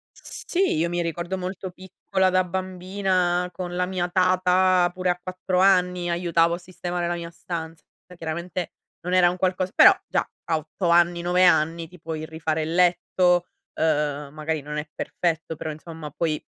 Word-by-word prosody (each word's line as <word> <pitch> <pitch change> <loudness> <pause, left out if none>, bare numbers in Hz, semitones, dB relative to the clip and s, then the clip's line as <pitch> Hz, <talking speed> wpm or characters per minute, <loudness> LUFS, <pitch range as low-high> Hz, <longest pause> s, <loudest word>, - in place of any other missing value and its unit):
Sì, 380 +2 -1
io 165 +2 +1
mi 175 0 -1
ricordo 170 +3 -3
molto 185 0 -5
piccola 190 +1 -1
da 185 0 +3
bambina 185 -1 -1
con 175 0 -5
la 180 0 +1
mia 180 -1 -2
tata 185 0 +3
pure 185 0 -1
a 180 0 0
4 185 0 -2
anni 180 -2 +3
aiutavo 170 -1 +2
a - - -6
sistemare 175 -1 -4
la 175 - -1
mia 170 0 -6
stanza. 165 -2 -6 0.3
Chiaramente 170 +2 -4 0.3
non 180 +1 -3
era 180 -1 +6
un 180 - -4
qualcosa 185 0 0
però 390 - +9 0.2
già - - -1 0.2
a 160 - +1
8 160 +4 -3
anni, 175 0 +4
9 180 +1 +3
anni 165 -1 +3
ti 180 +2 -15
puoi 160 -1 -5
rifare 160 0 -2
il 160 +1 -3
letto, 180 0 +3 0.3
uhm, 150 -2 0
magari 155 +1 -2
non 150 +1 -6
è 150 +1 -4
perfetto, 165 -1 -2
però 155 +1 -5
insomma 155 0 -9
puoi 155 0 -2
175 Hz, 170 wpm, -24 LUFS, 165-185 Hz, 0.3 s, però